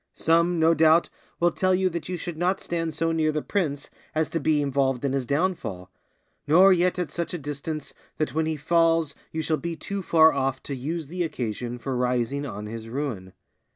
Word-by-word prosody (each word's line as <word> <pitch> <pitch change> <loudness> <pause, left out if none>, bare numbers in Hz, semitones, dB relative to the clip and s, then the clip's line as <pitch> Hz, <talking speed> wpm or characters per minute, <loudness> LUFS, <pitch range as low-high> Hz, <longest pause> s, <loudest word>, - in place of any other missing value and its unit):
Some, 170 +2 +2
no 160 +1 +5
doubt, 160 +1 +4 0.3
will 175 0 +3
tell 185 +1 +2
you 190 0 +2
that 170 0 -5
you 180 - -2
should 175 0 -5
not 180 +4 0
stand 165 -1 -2
so 165 +2 0
near 160 -1 +1
the 150 0 -2
prince 150 -8 -2 0.2
as 155 0 +1
to 165 - -1
be 155 0 +2
involved 135 -2 0
in 135 - 0
his 135 -3 -1
downfall; 140 - -2 0.6
nor 185 +6 +7
yet 180 +1 +2
at 175 -5 -2
such 170 0 -3
a - - -2
distance 150 0 -5 0.2
that 155 - -1
when 160 +1 0
he 160 - -1
falls 165 0 +2 0.2
you 160 0 -3
shall 155 0 +1
be 170 +1 -4
too 200 +4 -4
far 160 -3 +5
off 135 -1 -1
to 140 - -5
use 155 +4 -4
the 180 +4 -4
occasion 120 -6 -3
for 130 +2 -4
rising 125 +3 0
on 105 -3 -6
his 115 +1 -7
ruin. 115 -9 -4
155 Hz, 205 wpm, -25 LUFS, 135-170 Hz, 0.6 s, nor